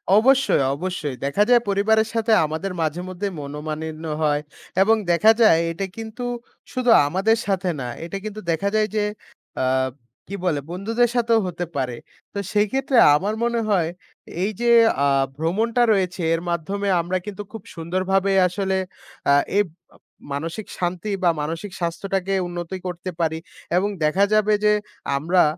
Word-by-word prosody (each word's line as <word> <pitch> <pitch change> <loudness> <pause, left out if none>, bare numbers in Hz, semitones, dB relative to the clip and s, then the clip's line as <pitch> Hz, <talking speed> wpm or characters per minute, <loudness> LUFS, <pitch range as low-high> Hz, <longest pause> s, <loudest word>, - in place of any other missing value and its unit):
অবশ্যই, 265 - +4
অবশ্যই, 150 -4 -4
দেখা 170 +9 +2
যায় 245 -1 +6
পরিবারের 220 +2 +3
সাথে, 225 0 0
আমাদের 160 +5 -3
মাঝেমধ্যে 180 +5 -3
মনমালিন্য 155 +2 -5 0.2
হয় 145 -1 +2 0.4
এবং 220 +3 +5 0.2
দেখা 210 +6 +6
যায় 165 -7 +6
এটা 195 +4 -3
কিন্তু 225 +2 -6 0.5
শুধু 255 -1 -1 0.2
আমাদের 195 +8 +2
সাথে 190 -2 0
না। 125 - -4 0.2
এটা 195 +3 -5
কিন্তু 215 0 -6
দেখা 195 +5 0
যায় 215 0 +3
যে, 210 - +2 0.6
আব 130 0 +1 0.3
কি 200 - -5
বলে? 155 -5 +1
বন্ধুদের 225 +6 +1
সাথেও 230 -1 +3
হতে 175 0 -4
পারে। 130 -3 -2 0.4
তো 200 - -3
সেই 210 0 +3
ক্ষেত্রে 270 -1 +1 0.2
আমার 200 +7 0
মনে 235 0 +1
হয়, 175 -5 +2 0.5
এই 210 - 0
যে 240 0 +3 0.3
আ - - +4 0.3
ভ্রমণটা 220 +9 +1
রয়েছে 185 -2 -1
এর 165 - 0
মাধ্যমে 195 +5 -2
আমরা 180 +2 -1
কিন্তু 205 0 -6
খুব 225 - -8
সুন্দরভাবে 185 +3 0 0.2
আসলে 190 +1 -1 0.5
আ - - +6 0.2
এই 205 - +5 0.3
মা - - -20 0.4
মানসিক 165 +9 -4
শান্তি, 180 +3 -2
বা 175 - +5
মানসিক 165 +6 -4
স্বাস্থ্যটাকে 190 +2 -2
উন্নতি 175 +1 -5
করতে 180 +1 -5
পারি, 160 -1 0 0.4
এবং 200 +3 +1 0.2
দেখা 185 +6 +3
যাবে, 215 0 +3
যে 210 - +5 0.4
আমরা 175 +6 +3
190 Hz, 155 wpm, -22 LUFS, 165-215 Hz, 0.6 s, যায়